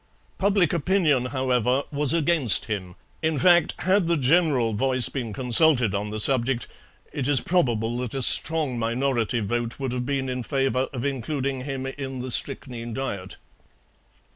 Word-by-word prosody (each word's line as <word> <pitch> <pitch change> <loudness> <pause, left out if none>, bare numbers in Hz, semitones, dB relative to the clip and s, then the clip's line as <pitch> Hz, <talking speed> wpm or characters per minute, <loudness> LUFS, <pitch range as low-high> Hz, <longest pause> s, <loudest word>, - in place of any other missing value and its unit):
Public 195 -5 +2
opinion, 165 -6 +1
however, 130 0 0
was 145 -2 +2
against 160 - +2
him 95 -5 -5 0.3
in 160 -1 0
fact, 175 +2 +3
had 185 -1 +2
the 170 0 +1
general 140 -5 +2
voice 130 +3 +4
been 120 -5 -5
consulted 125 - +4
on 105 +1 -3
the 110 +1 -4
subject 125 +1 +2 0.5
it 135 -3 -3
is 145 -3 +2
probable 120 -10 0
that 125 0 -5
a 135 - -1
strong 150 -3 +2
minority 120 0 -1
vote 120 +4 -3
would 135 -2 -3
have 125 0 -4
been 135 -2 -2
in 125 0 -3
favour 135 0 -1
of 125 -1 -5
including 135 0 -3
him 135 -2 -5
in 135 -1 -6
the 125 0 -5
strychnine 120 -4 -3
diet. 100 -9 -5
130 Hz, 155 wpm, -24 LUFS, 120-145 Hz, 0.5 s, voice